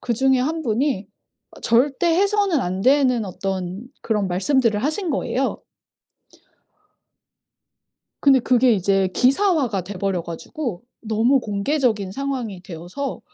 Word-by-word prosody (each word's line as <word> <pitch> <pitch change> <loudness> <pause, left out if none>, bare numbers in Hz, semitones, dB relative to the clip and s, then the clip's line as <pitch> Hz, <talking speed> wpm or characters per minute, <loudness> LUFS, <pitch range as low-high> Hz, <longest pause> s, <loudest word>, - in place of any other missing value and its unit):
그중에 260 +2 +2
1 315 +5 -1
분이 235 -3 -1 0.6
절대 265 +7 +2
해서는 395 -2 +2
안 185 -1 -3
되는 255 -1 +3
어떤 190 +3 -5
그런 210 -4 0
말씀들을 215 +3 +1
하신 315 +5 -1
거예요. 270 -1 -1 2.6
근데 275 -2 +5
그게 250 0 +3
이제 195 -1 +2
기사화가 270 - +2
돼 195 +4 -8
버려 190 -2 -1
가지고 175 - -6 0.2
너무 225 +4 +2
공개적인 210 -2 -1
상황이 255 -7 -4
되어서 180 - -6
240 Hz, 245 characters per minute, -22 LUFS, 195-275 Hz, 2.6 s, 근데